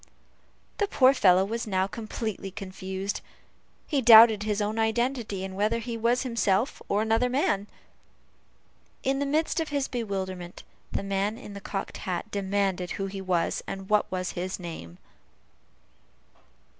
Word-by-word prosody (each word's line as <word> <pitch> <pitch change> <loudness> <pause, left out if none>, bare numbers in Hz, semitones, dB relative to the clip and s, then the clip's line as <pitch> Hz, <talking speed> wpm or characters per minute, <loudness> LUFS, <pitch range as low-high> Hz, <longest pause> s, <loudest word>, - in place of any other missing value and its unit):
The 410 - +2
poor 265 -8 +5
fellow 190 -6 +5
was 230 +2 -3
now 190 -2 +1
completely 215 -1 -5
confounded. 190 0 -5 0.6
He 285 -4 0
doubted 225 -2 +9
his 210 0 -1
own 210 +2 -1
identity, 225 -3 0
and 190 0 -7
whether 210 +4 +1
he 230 0 -4
was 235 +3 +1
himself 230 -1 0
or 205 +2 +2
another 225 +3 +2
man. 210 -6 +1 1.4
In 270 +1 +1
the 285 - 0
midst 315 +4 +1
of 320 - -2
his 285 -2 -1
bewilderment, 190 -6 -4 0.3
the - - -2
man 200 +2 -1
in 220 -5 -10
the 200 - -8
cocked 195 0 -5
hat 185 +3 -4
demanded 195 -2 -1
who 195 - -2
he 195 0 -5
was, 180 -3 0
and 195 0 -6
what 210 -1 +3
was 185 -1 -2
his 185 +2 -4
name? 125 - -8
205 Hz, 145 wpm, -27 LUFS, 190-235 Hz, 1.4 s, doubted